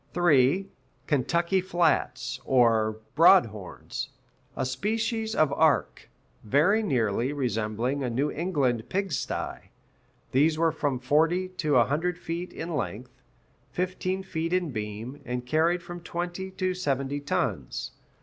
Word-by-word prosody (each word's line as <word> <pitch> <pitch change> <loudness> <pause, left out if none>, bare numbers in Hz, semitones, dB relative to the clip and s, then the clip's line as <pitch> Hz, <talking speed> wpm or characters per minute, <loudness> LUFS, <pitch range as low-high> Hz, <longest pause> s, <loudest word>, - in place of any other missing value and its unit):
(3) 175 +1 +4 0.4
Kentucky 170 +6 +1
flats 175 -2 0
(or 115 -4 +3 0.2
"broad 175 +2 +7
horns"), 105 -4 -7 0.5
"a 130 - 0
species 220 - -1
of 155 -3 +3
ark, 155 0 +1 0.3
very 155 - +3
nearly 120 - 0
resembling 120 0 -1
a 125 - -1
New 135 +6 0
England 140 -9 -1
pig 195 -1 -1
stye;" 140 - -4 0.6
these 155 +4 +3
were 165 0 +3
from 145 -4 -1
forty 160 +8 +2
to 155 -5 -1
a 120 -2 +6
hundred 175 +5 -1
feet 175 +1 -5
in 165 0 -5
length, 125 0 -5 0.5
fifteen 185 +1 -2
feet 165 -2 -3
in 180 -4 +1
beam, 110 +4 -6
and 125 0 -4
carried 165 +6 +2
from 175 0 -7
twenty 175 +2 -4
to 185 0 -1
seventy 140 -5 -1
tons. 140 - -2
155 Hz, 130 wpm, -27 LUFS, 125-180 Hz, 0.6 s, broad